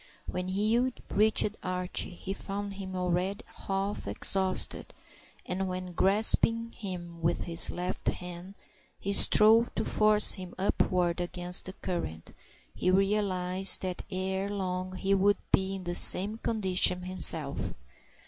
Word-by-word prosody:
When 180 0 -4
Hugh 220 +7 0 0.2
reached 215 0 +2
Archie 180 0 -2
he 190 +2 -6
found 200 +1 -6
him 190 -1 -8
already 180 +3 -2 0.2
half 195 - -3
exhausted, 185 - +1 0.5
and 190 +1 -3
when, 185 0 -5
grasping 225 +4 +3
him 175 -5 -8
with 170 +1 0
his 165 -1 -1
left 180 +1 -5
hand, 180 +2 -5 0.4
he 200 - -2
strove 225 +4 +6
to 220 - -1
force 215 0 +4
him 185 -2 -5
upward 180 -2 0
against 175 0 +1
the 190 - -6
current, 170 - -6 0.4
he 185 - -1
realized 190 -1 +1
that 185 -1 -4
ere 190 +1 -3
long 185 -2 -4
he 195 +1 -1
would 200 +1 +3
be 190 0 +1
in 190 - -8
the 175 0 -4
same 205 +5 +5
condition 185 -5 +2
himself. 165 -6 0
190 Hz, 130 wpm, -28 LUFS, 180-200 Hz, 0.5 s, strove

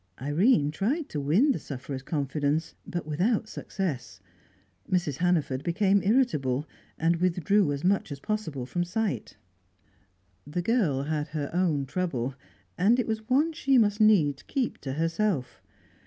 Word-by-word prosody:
Irene 150 - +3
tried 265 - -1
to 150 - -3
win 185 - +3
the - - -1
sufferer's 135 0 -6
confidence, 145 +2 -1
but 175 -3 -4
without 195 +9 0
success. 150 - -4 0.7
Mrs. 175 -7 0
Hannaford 160 -7 +1
became 195 +3 +2
irritable, 155 - +1 0.3
and 165 +1 +2
withdrew 180 0 +2
as 140 0 -3
much 190 -3 +1
as 140 - -5
possible 160 -10 -3
from 175 +7 -1
sight. 180 - -3 1.1
The 175 +4 -2
girl 175 - +1
had 150 0 -2
her 150 -2 -4
own 165 -6 +1
trouble, 135 -5 -2 0.5
and 220 +7 +4
it 250 - +1
was 220 0 -4
one 300 +6 +3
she 275 -4 +2
must 210 -2 +3
needs 160 -10 +4
keep 265 -4 -2
to 135 - -5
herself. 165 -2 -1
170 Hz, 140 wpm, -27 LUFS, 145-210 Hz, 1.1 s, and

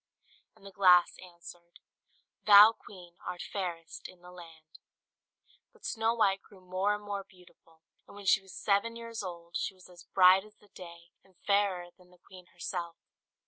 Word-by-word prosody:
And - - -21
the 195 - -10
glass 180 -2 +4
answered, 175 -1 -14 0.7
"Thou, 210 +1 +9
Queen, 180 -6 -15
art 180 -1 -6
fairest 170 -4 -6
in 185 -1 -17
the 180 - -13
land." 165 -3 -15 0.9
But 465 - -18
Snow 225 0 0
White 195 -4 +1
grew 200 - -19
more 185 +3 -1
and 210 - -10
more 200 -1 -5
beautiful; 175 -3 -23 0.2
and - - -15
when 205 -1 -11
she 195 +1 +4
was 190 -1 -14
seven 210 +3 0
years 230 -1 -7
old, 170 -3 -9
she 195 - -4
was 185 0 -18
as 175 -2 -16
bright 185 0 +5
as 210 0 -18
the 210 - -25
day, 170 -2 -13
and 190 -1 -27
fairer 195 -3 0
than 180 -1 -23
the 180 - -22
queen 180 0 -16
herself. 170 -1 -6
185 Hz, 175 wpm, -30 LUFS, 175-200 Hz, 0.9 s, Thou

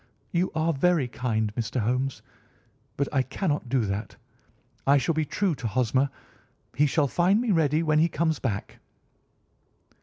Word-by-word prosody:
"You 180 +1 0
are 160 +1 +1
very 155 -1 +2
kind, 110 -4 -2
Mr. 115 +2 -2
Holmes, 125 +5 -1 0.7
but 140 - 0
I 135 - +3
cannot 145 0 -2
do 130 0 +2
that. 100 +2 -4 0.7
I 140 +1 +6
shall 165 +5 +1
be 155 0 0
true 190 +3 0
to 135 -5 -4
Hosmer. 130 +4 +1 0.7
He 150 +2 +4
shall 145 +1 +2
find 180 - +3
me 240 -2 0
ready 160 -2 +2
when 155 -1 +3
he 165 +2 +3
comes 160 -1 0
back." 105 -6 -4
140 Hz, 155 wpm, -26 LUFS, 125-165 Hz, 0.7 s, I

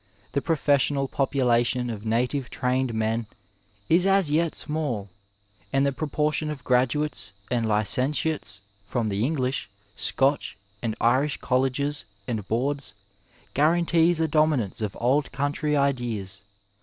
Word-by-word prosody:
The 140 - 0
profeeaional 140 -3 +1
population 125 -2 +1
of 110 0 -6
native 125 +4 0
trained 125 0 0
men 110 0 -1 0.6
is 175 +3 +4
as 195 -6 +3
yet 165 +1 +1
small, 130 - -3 0.6
and 135 +1 +3
the 140 - +2
proportion 150 +2 -1
of 145 -4 -6
graduates 130 -1 +1 0.2
and 120 -2 +1
licentiates 125 +3 0 0.2
from 110 +2 -1
the 100 +1 0
English, 130 -4 -1 0.3
Scotch 135 +4 0 0.2
and 115 -2 -2
Irish 130 +5 +2
colleges 135 +3 0 0.2
and 110 -5 -3
boards 130 -1 -1 0.6
guarantees 170 +2 +3
a 160 - +2
domi* 155 -1 +3
nance 110 -3 -4
of 105 -2 -3
Old 135 +5 +2
Country 145 +3 0
ideas. 120 -9 -1
135 Hz, 125 wpm, -26 LUFS, 115-150 Hz, 0.6 s, is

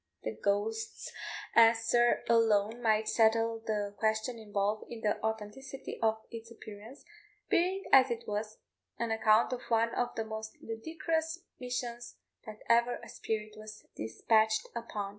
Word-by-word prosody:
The 110 - -2
ghost's 205 - -2 0.4
answer 230 +1 +5
alone 225 0 +3
might 220 -1 +2
settle 225 0 +3
the 210 -2 -2
question 220 +2 0
involved 205 0 -1
in 230 -2 -7
the 210 -1 0
authenticity 220 +5 -5
of 220 -1 +3
its 230 -1 -8
appearance, 220 +2 -11 0.4
being, 375 +3 +2
as 265 -1 +7
it 235 -1 -3
was, 210 +1 -3 0.4
an 235 -1 -2
account 220 +2 +4
of 250 - -4
one 230 0 +2
of 245 - -1
the 225 - -2
most 220 0 -6
ludicrous 320 +8 -3 0.2
missions 245 -1 -4 0.3
that 215 0 -9
ever 235 +1 +4
a - - -10
spirit 215 -1 -4
was 215 0 -11
despatched 220 - +2
upon. 215 -4 -4
225 Hz, 140 wpm, -31 LUFS, 215-235 Hz, 0.4 s, as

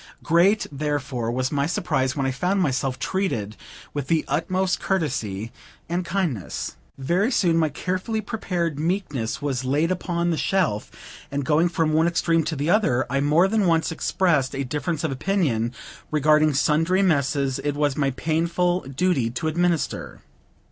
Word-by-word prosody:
Great, 180 +6 +3
therefore, 140 -5 -2
was 130 +2 -1
my 145 -1 +1
surprise, 165 -8 0
when 140 -2 -1
I 135 - +1
found 180 +9 0
myself 130 -5 0
treated 115 - -2 0.4
with 145 -2 -3
the 160 0 +1
utmost 180 +5 0
courtesy 115 - -2 0.4
and 175 +2 -1
kindness. 170 - -3 0.2
Very 175 - +1
soon 175 -8 +2
my 160 -2 +2
carefully 185 +8 -2
prepared 180 -8 -2
meekness 150 - -2
was 135 -3 -1
laid 145 +6 +1
upon 175 -1 -1
the 165 - 0
shelf; 165 - 0 0.4
and, 140 -1 -2
going 160 +4 +3
from 165 -2 0
one 160 +2 +4
extreme 165 -1 +2
to 155 +1 -2
the 145 +2 -2
other, 130 - +2
I 140 0 +1
more 155 +6 +4
than 210 -1 +1
once 165 -1 +2
expressed 160 -5 +1
a 140 - -1
difference 150 +4 -2
of 160 - 0
opinion 135 - 0 0.4
regarding 155 0 +3
sundry 165 +7 +2
messes 140 -5 +1
it 145 -1 -2
was 145 -2 +1
my 140 -2 +1
painful 170 +5 0
duty 135 -4 +1
to 125 +7 -3
administer. 170 -2 -1
155 Hz, 155 wpm, -24 LUFS, 135-175 Hz, 0.4 s, one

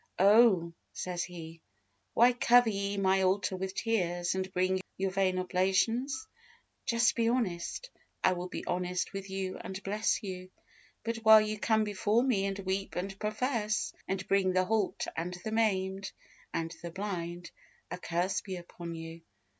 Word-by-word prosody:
"Oh," 195 -4 +5 0.2
says 180 -1 -3
He, 165 -2 -10 0.5
"why 245 +2 +6
cover 245 -1 +5
ye 200 0 -2
my 190 0 +3
altar 190 0 +1
with 190 +1 -4
tears, 175 -6 0
and 190 0 -3
bring 185 +1 +1 0.2
your 190 0 0
vain 185 -1 +1
oblations? 195 +9 +1 0.6
Just 235 -2 +3
be 230 -1 +2
honest, 235 - -2 0.3
and - - +5
I - - +2
will 180 0 -4
be - - -6
honest 180 +1 -2
with 195 0 -6
you 190 -1 -3
and 190 +1 -7
bless 210 +3 0
you; 185 -2 -6 0.5
but 230 0 -2
while 220 -1 +8
you 215 0 -2
come 220 0 +2
before 210 +3 +1
Me 205 -7 +1
and 195 0 -3
weep 195 0 -3
and 195 +2 -4
profess, 215 0 -1
and 190 0 -3
bring 190 -2 +2
the 185 0 +3
halt, 215 -1 0
and 175 +2 -3
the 220 - -3
maimed, 195 -3 0 0.4
and 165 0 -3
the 170 - -5
blind, 175 -2 -5 0.4
a - - -4
curse 180 +3 -1
be 190 -1 -6
upon 170 -1 -8
you." 165 0 -8
190 Hz, 160 wpm, -31 LUFS, 180-215 Hz, 0.6 s, while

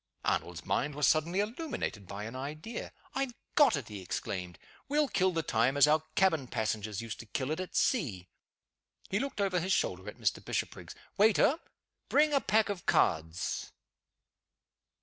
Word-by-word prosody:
Arnold's 85 -1 -1
mind 145 +2 0
was 150 -2 +2
suddenly 165 +7 +3
illuminated 220 - -4
by 100 +2 -6
an 115 +4 -6
idea. 155 - -5 0.2
"I 270 - -1
have 255 -3 -2 0.2
got 290 - +6
it!" 140 -6 -4
he 105 -3 -7
exclaimed. 90 -1 -4 0.3
"We'll 295 +1 +3
kill 190 -6 +2
the 165 -2 -1
time 125 +3 +2
as 145 - +8
our 155 +1 +4
cabin 160 -9 +3
passengers 110 -2 -2
used 115 -1 -6
to 115 - -9
kill 130 +5 -2
it 160 - -1
at 185 - -5
sea." 110 - +1 0.8
He 195 - +2
looked 275 -2 -4
over 195 -3 +2
his 185 +3 0
shoulder 95 - -1
at - - -11
Mr. - - 0
Bishopriggs. - - -4 0.2
"Waiter! 220 +8 +5 0.5
bring 300 0 +4
a 275 - +4
pack 220 0 +2
of 200 -3 -4
cards." 80 +2 +1
155 Hz, 170 wpm, -31 LUFS, -, 0.8 s, as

